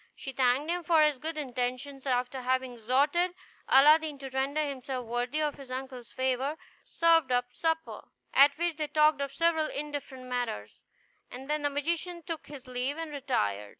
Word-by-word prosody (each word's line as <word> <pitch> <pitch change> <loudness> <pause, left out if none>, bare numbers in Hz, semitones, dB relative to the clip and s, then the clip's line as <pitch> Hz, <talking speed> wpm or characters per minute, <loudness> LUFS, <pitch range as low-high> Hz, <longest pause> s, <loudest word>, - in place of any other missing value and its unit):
She 270 - -6
thanked 265 +4 +2
him 355 0 -1
for 325 -1 +4
his 300 -3 +2
good 315 +3 -4
intentions; 260 0 -3
and 260 - +3
after 250 +1 -2
having 255 0 0
exhorted 285 +10 +1 0.3
Aladdin 300 +2 +6
to 270 -1 -8
render 275 +3 0
himself 260 -2 -4
worthy 245 +6 -1
of 300 -1 0
his 275 -2 -11
uncle's 255 -1 -6
favor, 260 +3 -1 0.3
served 330 -5 +3
up 245 0 0
supper, 325 0 -2 0.3
at 280 +1 +6
which 340 -2 -1
they 305 -1 -1
talked 305 -1 +3
of 280 -1 -2
several 320 +1 +2
indifferent 285 -3 -5
matters; 245 - -4 0.5
and 260 +2 -9
then 300 0 0
the 290 - +1
magician 335 +4 -2
took 325 -1 -6
his 280 -3 -10
leave 255 +3 -2
and 325 -2 -5
retired. 105 - -1
280 Hz, 175 wpm, -29 LUFS, 255-310 Hz, 0.5 s, Aladdin